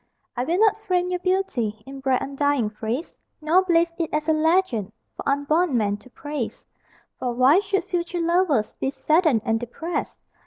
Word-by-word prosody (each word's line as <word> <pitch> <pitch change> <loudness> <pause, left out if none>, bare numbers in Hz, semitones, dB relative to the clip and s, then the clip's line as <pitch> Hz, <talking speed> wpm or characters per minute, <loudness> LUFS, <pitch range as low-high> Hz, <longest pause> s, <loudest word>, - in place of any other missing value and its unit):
I 245 0 -1
will 340 +4 0
not 435 +1 +3
frame 365 -3 0
your 360 - -1
beauty 265 - -1
In 270 0 -9
bright 265 -1 +1
undying 275 -5 0
phrase, 225 +8 -4 0.2
Nor 330 +4 +3
blaze 340 -2 +2
it 330 - -1
as 305 +1 -1
a 315 - +4
legend 310 - +1 0.2
For - - -3
unborn 285 +1 +2
men 205 -2 0
to 210 +5 -18
praise 290 -2 -5 0.5
For 250 - -1
why 260 +8 +5
should 395 -2 -1
future 350 -2 -3
lovers 335 - +1
Be 265 - 0
saddened 305 - +2
and 225 0 +1
depressed? 320 +9 -4
305 Hz, 170 wpm, -24 LUFS, 250-355 Hz, 0.5 s, why